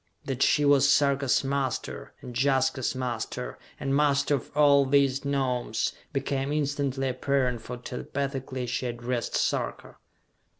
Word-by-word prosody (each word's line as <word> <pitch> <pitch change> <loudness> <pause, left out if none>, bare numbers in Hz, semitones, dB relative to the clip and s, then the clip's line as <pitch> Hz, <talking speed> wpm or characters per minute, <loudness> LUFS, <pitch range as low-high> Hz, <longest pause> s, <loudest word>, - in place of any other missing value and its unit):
That 135 0 -3
she 150 -1 +4
was 140 -1 +5
Sarka's 140 -2 +3
master, 135 -2 -3
and 125 - -8
Jaska's 130 0 +1
master, 125 -1 -4 0.2
and 135 -1 0
master 140 0 +3
of 135 - -2
all 140 -1 +6
these 135 0 +2
Gnomes, 130 -5 -1 0.2
became 135 0 -1
instantly 140 -2 -1
apparent 125 -2 0
for 125 +2 -7
telepathically 130 +1 -4
she 125 +1 -2
addressed 120 0 -3
Sarka. - - -2
135 Hz, 125 wpm, -27 LUFS, 125-140 Hz, 0.2 s, all